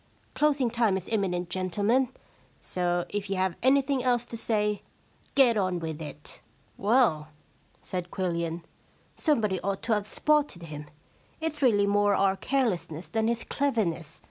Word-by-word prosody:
Closing 285 Hz, -5 st, +2 dB
time 225 Hz, -5 st, +2 dB
is 185 Hz, -, -7 dB
imminent, 180 Hz, -5 st, -1 dB
gentlemen. 205 Hz, +8 st, +1 dB, 0.5 s
So 175 Hz, -1 st, -1 dB
if 205 Hz, -1 st, -3 dB
you 195 Hz, -, 0 dB
have 185 Hz, -2 st, 0 dB
anything 270 Hz, 0 st, +3 dB
else 245 Hz, -1 st, +2 dB
to 235 Hz, -, -7 dB
say, 210 Hz, -2 st, 0 dB, 0.5 s
get 245 Hz, -5 st, +5 dB
on 185 Hz, -3 st, +1 dB
with 160 Hz, -2 st, -5 dB
it.' 150 Hz, -1 st, -9 dB, 0.2 s
* -, -, -35 dB
Well,* 200 Hz, -8 st, +2 dB, 0.5 s
said 180 Hz, -1 st, -4 dB
Quillian, 170 Hz, -3 st, -2 dB, 0.3 s
* -, -, -35 dB
somebody 215 Hz, -, +2 dB
ought 200 Hz, 0 st, -2 dB
to 225 Hz, -, +1 dB
have 210 Hz, -1 st, 0 dB
spotted 295 Hz, -, +1 dB
him. 150 Hz, -2 st, -8 dB, 0.5 s
It's 320 Hz, -2 st, -3 dB
really 210 Hz, -6 st, +4 dB
more 205 Hz, 0 st, +3 dB
our 195 Hz, -1 st, +3 dB
carelessness 190 Hz, -, -1 dB
than 220 Hz, +5 st, 0 dB
his 235 Hz, 0 st, 0 dB
cleverness. 180 Hz, -, -1 dB
205 Hz, 150 wpm, -28 LUFS, 175-240 Hz, 0.5 s, get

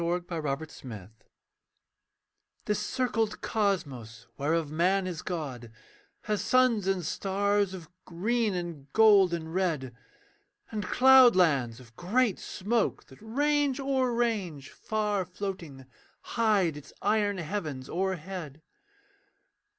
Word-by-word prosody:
KING'S 175 Hz, +1 st, -1 dB
CROSS 160 Hz, -2 st, -3 dB
STATION 110 Hz, -7 st, -9 dB, 1.6 s
This 210 Hz, -1 st, 0 dB
circled 225 Hz, -1 st, -1 dB
cosmos 135 Hz, -, -2 dB
whereof 155 Hz, +1 st, -1 dB
man 185 Hz, +4 st, +2 dB
is 175 Hz, -4 st, -4 dB
god 135 Hz, -10 st, -5 dB, 0.5 s
Has 210 Hz, -1 st, -1 dB
suns 250 Hz, -6 st, +3 dB
and 190 Hz, -3 st, 0 dB
stars 200 Hz, +2 st, 0 dB
of 170 Hz, -4 st, -10 dB, 0.2 s
green 215 Hz, +4 st, 0 dB
and 165 Hz, -6 st, -6 dB
gold 205 Hz, -5 st, +6 dB
and 160 Hz, -1 st, -4 dB
red, 155 Hz, -10 st, -1 dB, 0.8 s
And 215 Hz, -2 st, -3 dB
cloudlands 185 Hz, -, +5 dB
of 120 Hz, -2 st, -17 dB
great 210 Hz, -, +1 dB
smoke, 220 Hz, +3 st, -1 dB
that 130 Hz, -, -15 dB
range 285 Hz, +4 st, +1 dB
o'er 265 Hz, -2 st, +1 dB
range 205 Hz, -, -2 dB
Far 210 Hz, -3 st, -1 dB
floating, 180 Hz, -7 st, -6 dB, 0.5 s
hide 210 Hz, -9 st, +2 dB
its 150 Hz, -, -12 dB
iron 205 Hz, -1 st, +1 dB
heavens 155 Hz, -7 st, -4 dB
o'erhead. 180 Hz, -4 st, -4 dB
185 Hz, 110 wpm, -28 LUFS, 155-215 Hz, 1.6 s, gold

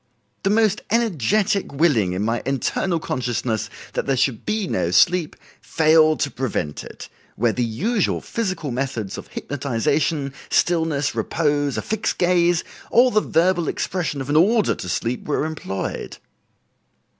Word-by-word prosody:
The 195 Hz, -, 0 dB
most 215 Hz, -1 st, +2 dB
energetic 210 Hz, -, +1 dB
willing 135 Hz, -, +2 dB
in 95 Hz, +3 st, -2 dB
my 115 Hz, +2 st, 0 dB
internal 140 Hz, +6 st, -1 dB
consciousness 120 Hz, -6 st, -2 dB, 0.2 s
that -, -, -2 dB
there 135 Hz, -1 st, +1 dB
should 130 Hz, -4 st, 0 dB
be 215 Hz, -1 st, 0 dB
no 90 Hz, -, 0 dB
sleep, 165 Hz, -, +3 dB, 0.3 s
failed 155 Hz, -1 st, +4 dB
to 140 Hz, -, 0 dB
prevent 115 Hz, -, -3 dB
it, -, -, -10 dB, 0.3 s
where 115 Hz, 0 st, +1 dB
the 125 Hz, -, 0 dB
usual 195 Hz, -, 0 dB
physical 185 Hz, -, -3 dB
methods 120 Hz, -5 st, -3 dB
of -, -, -11 dB
hypnotization, 140 Hz, +2 st, -1 dB, 0.2 s
stillness, 160 Hz, -5 st, +1 dB
repose, 145 Hz, +4 st, 0 dB
a -, -, -2 dB
fixed 215 Hz, 0 st, -2 dB
gaze, 175 Hz, -1 st, +3 dB, 0.3 s
or 250 Hz, +2 st, +5 dB
the 215 Hz, -, +3 dB
verbal 175 Hz, -2 st, +1 dB
expression 165 Hz, -6 st, -2 dB
of 135 Hz, -, -6 dB
an -, -, +1 dB
order 210 Hz, +7 st, +4 dB
to 90 Hz, -5 st, -7 dB
sleep, 120 Hz, +7 st, -2 dB
were 150 Hz, 0 st, 0 dB
employed." 150 Hz, -12 st, -5 dB
150 Hz, 145 wpm, -22 LUFS, 125-180 Hz, 0.3 s, or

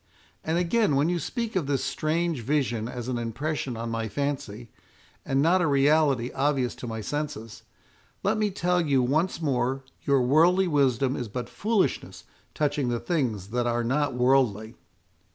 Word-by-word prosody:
And 160 Hz, +2 st, 0 dB
again, 180 Hz, -1 st, +2 dB
when 145 Hz, +4 st, +2 dB
you 175 Hz, -1 st, 0 dB
speak 230 Hz, -, -4 dB
of 170 Hz, -7 st, 0 dB
this 140 Hz, -2 st, 0 dB
strange 155 Hz, +1 st, -1 dB
vision 120 Hz, -4 st, -1 dB
as 120 Hz, -1 st, -6 dB
an 125 Hz, -2 st, -2 dB
impression 125 Hz, +2 st, -3 dB
on 115 Hz, 0 st, -4 dB
my 115 Hz, -1 st, -2 dB
fancy, 125 Hz, -5 st, -4 dB, 0.5 s
and 135 Hz, +1 st, +1 dB
not 180 Hz, +3 st, +4 dB
a 170 Hz, -, +2 dB
reality 140 Hz, -3 st, +3 dB
obvious 135 Hz, -3 st, 0 dB
to 125 Hz, -, -7 dB
my 110 Hz, -1 st, -4 dB
senses, 145 Hz, -3 st, -5 dB, 0.6 s
let 200 Hz, +3 st, +2 dB
me 215 Hz, -1 st, +1 dB
tell 180 Hz, -2 st, +1 dB
you 140 Hz, -4 st, +2 dB
once 160 Hz, +6 st, 0 dB
more, 135 Hz, -1 st, 0 dB, 0.2 s
your 140 Hz, -2 st, +2 dB
worldly 170 Hz, +8 st, +4 dB
wisdom 135 Hz, -4 st, +2 dB
is 120 Hz, -, -4 dB
but 120 Hz, +3 st, -5 dB
foolishness 215 Hz, -1 st, -1 dB, 0.3 s
touching 145 Hz, -3 st, 0 dB
the 120 Hz, -1 st, -1 dB
things 115 Hz, -, -2 dB
that 120 Hz, +2 st, -1 dB
are 120 Hz, 0 st, 0 dB
not 135 Hz, +2 st, 0 dB
worldly." 125 Hz, -4 st, +2 dB
140 Hz, 165 wpm, -26 LUFS, 120-155 Hz, 0.6 s, not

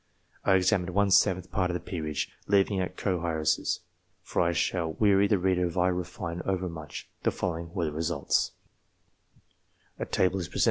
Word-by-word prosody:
I 95 Hz, -, +4 dB
examined 90 Hz, -1 st, +2 dB
one 100 Hz, -1 st, +3 dB
seventh 95 Hz, -1 st, +3 dB
part 90 Hz, -3 st, +1 dB
of 90 Hz, -, -1 dB
the -, -, -1 dB
peerage. 75 Hz, -5 st, -3 dB, 0.2 s
Leaving 100 Hz, 0 st, +3 dB
out 90 Hz, 0 st, -4 dB
co 90 Hz, -4 st, -1 dB
heiresses 80 Hz, 0 st, 0 dB, 0.4 s
for -, -, 0 dB
I 85 Hz, 0 st, +3 dB
shall 85 Hz, -1 st, 0 dB
weary 100 Hz, 0 st, +4 dB
the 105 Hz, -, +3 dB
reader 90 Hz, -1 st, +2 dB
if 85 Hz, -, -6 dB
I 90 Hz, +1 st, +4 dB
refine 90 Hz, -1 st, -3 dB
overmuch 90 Hz, -5 st, -4 dB
the -, -, +2 dB
following 85 Hz, -1 st, -3 dB
were 85 Hz, -4 st, 0 dB
the 75 Hz, -, -2 dB
results: 80 Hz, -1 st, 0 dB, 1.5 s
No. -, -, -3 dB
90 Hz, 155 wpm, -28 LUFS, 85-95 Hz, 1.5 s, I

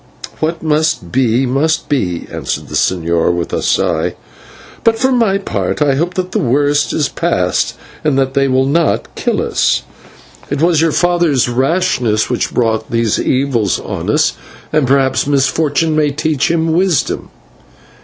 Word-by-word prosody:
"What 165 Hz, +2 st, -2 dB
must 155 Hz, +1 st, 0 dB
be, 125 Hz, 0 st, +2 dB
must 145 Hz, +5 st, 0 dB
be," 90 Hz, -12 st, -1 dB
answered -, -, -4 dB
the -, -, -9 dB
señor 85 Hz, -2 st, +1 dB
with 85 Hz, -1 st, -3 dB
a -, -, 0 dB
sigh, -, -, 0 dB, 0.7 s
"but 225 Hz, -1 st, +3 dB
for 260 Hz, +3 st, +1 dB
my 230 Hz, -6 st, +2 dB
part 200 Hz, -, -3 dB
I 145 Hz, -2 st, +2 dB
hope 170 Hz, +6 st, -1 dB
that 185 Hz, -1 st, -3 dB
the -, -, 0 dB
worst 145 Hz, +3 st, +1 dB
is 150 Hz, -, 0 dB
past -, -, -1 dB, 0.3 s
and 150 Hz, -3 st, +1 dB
that 135 Hz, -1 st, +1 dB
they 135 Hz, 0 st, +2 dB
will 130 Hz, 0 st, +2 dB
not 160 Hz, +3 st, 0 dB
kill -, -, -1 dB
us. -, -, +1 dB, 0.7 s
It 145 Hz, -, -2 dB
was 165 Hz, 0 st, +3 dB
your 165 Hz, -1 st, +2 dB
father's 170 Hz, -7 st, +2 dB
rashness 125 Hz, -4 st, 0 dB
which 125 Hz, -, -1 dB
brought 110 Hz, -2 st, 0 dB
these 115 Hz, -2 st, 0 dB
evils 125 Hz, -7 st, 0 dB
on -, -, -5 dB
us, -, -, +2 dB, 0.4 s
and 150 Hz, -4 st, +2 dB
perhaps 135 Hz, 0 st, +2 dB
misfortune 145 Hz, +3 st, +1 dB
may 150 Hz, -1 st, +2 dB
teach 150 Hz, 0 st, -1 dB
him 165 Hz, -1 st, +1 dB
wisdom." 180 Hz, -1 st, 0 dB
145 Hz, 155 wpm, -15 LUFS, 130-160 Hz, 0.7 s, but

